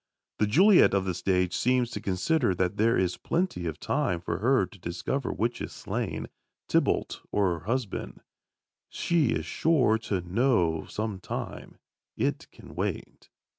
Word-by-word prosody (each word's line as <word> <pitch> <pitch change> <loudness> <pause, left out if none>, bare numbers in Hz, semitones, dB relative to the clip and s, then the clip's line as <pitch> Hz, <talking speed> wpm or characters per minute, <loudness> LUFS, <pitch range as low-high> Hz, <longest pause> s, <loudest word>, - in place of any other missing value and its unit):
The 105 - +3
Juliet 180 - +6
of 95 -1 +1
the 95 - -1
stage 90 0 0
seems 125 -1 +1
to - - -5
consider 95 - +1
that 90 +2 -1
there 115 +2 +3
is 90 -1 0
plenty 165 - -1
of 80 -2 -5
time 85 - 0
for 85 - -3
her 130 +5 +3
to 100 - -16
discover 90 +10 -3
which 115 +3 -2
is - - -5
slain - - -3 0.4
Tybalt - - +1
or 95 -4 +2
her 80 - -18
husband; 120 -2 -3 0.7
she 170 -5 +1
is 80 -8 -1
sure 125 - +2
to 105 -5 -2
know 90 - +1
some 110 -3 -4
time; - - -6 0.4
it - - -1
can - - -14
wait. - - -4
105 Hz, 155 wpm, -28 LUFS, 90-125 Hz, 0.7 s, Juliet